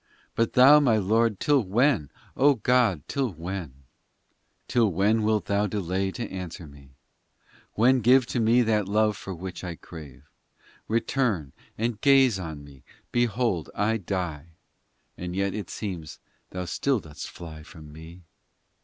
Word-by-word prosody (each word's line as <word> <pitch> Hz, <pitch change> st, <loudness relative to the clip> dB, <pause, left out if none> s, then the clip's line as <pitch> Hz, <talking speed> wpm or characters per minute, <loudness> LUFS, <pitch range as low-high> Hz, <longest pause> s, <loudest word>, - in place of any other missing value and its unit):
But 115 Hz, 0 st, 0 dB
Thou, 135 Hz, +4 st, +8 dB
my 125 Hz, -7 st, +3 dB
Lord, 110 Hz, +1 st, +1 dB
till 145 Hz, -2 st, +3 dB
when? 110 Hz, -, +1 dB, 0.3 s
O 145 Hz, +1 st, +4 dB
God! 115 Hz, -, +2 dB
till 135 Hz, -3 st, -1 dB
when, 90 Hz, +3 st, -5 dB
XIX -, -, -24 dB, 0.9 s
Till 115 Hz, -4 st, +2 dB
when, 105 Hz, +6 st, +2 dB
wilt 105 Hz, 0 st, +1 dB
Thou 100 Hz, +1 st, +1 dB
delay 95 Hz, -1 st, -2 dB
to 115 Hz, +5 st, -5 dB
answer 90 Hz, -2 st, -7 dB
me? 70 Hz, -2 st, -16 dB, 0.8 s
When 125 Hz, +4 st, +4 dB
give 125 Hz, +3 st, +5 dB
to 120 Hz, -, -3 dB
me 115 Hz, +2 st, +4 dB
that 105 Hz, -3 st, +1 dB
love 105 Hz, +1 st, +2 dB
for 95 Hz, 0 st, -7 dB
which 90 Hz, +2 st, -7 dB
I 90 Hz, -2 st, -5 dB
crave? 75 Hz, -6 st, -12 dB, 0.6 s
Return 110 Hz, -, -1 dB, 0.2 s
and 115 Hz, 0 st, -2 dB
gaze 135 Hz, -7 st, +4 dB
on 80 Hz, -5 st, -7 dB
me 70 Hz, -3 st, -15 dB, 0.3 s
Behold 120 Hz, -6 st, 0 dB
I 110 Hz, +2 st, +1 dB
die 85 Hz, -5 st, -5 dB, 0.7 s
And 90 Hz, 0 st, -5 dB
yet 100 Hz, 0 st, -1 dB
it 105 Hz, -, -5 dB
seems 90 Hz, -7 st, -6 dB, 0.3 s
Thou 90 Hz, 0 st, -5 dB
still 130 Hz, +8 st, 0 dB
dost 80 Hz, -6 st, -9 dB
fly 80 Hz, -3 st, -10 dB
from 75 Hz, -2 st, -13 dB
me. 80 Hz, +3 st, -12 dB
100 Hz, 150 wpm, -26 LUFS, 85-115 Hz, 0.9 s, Thou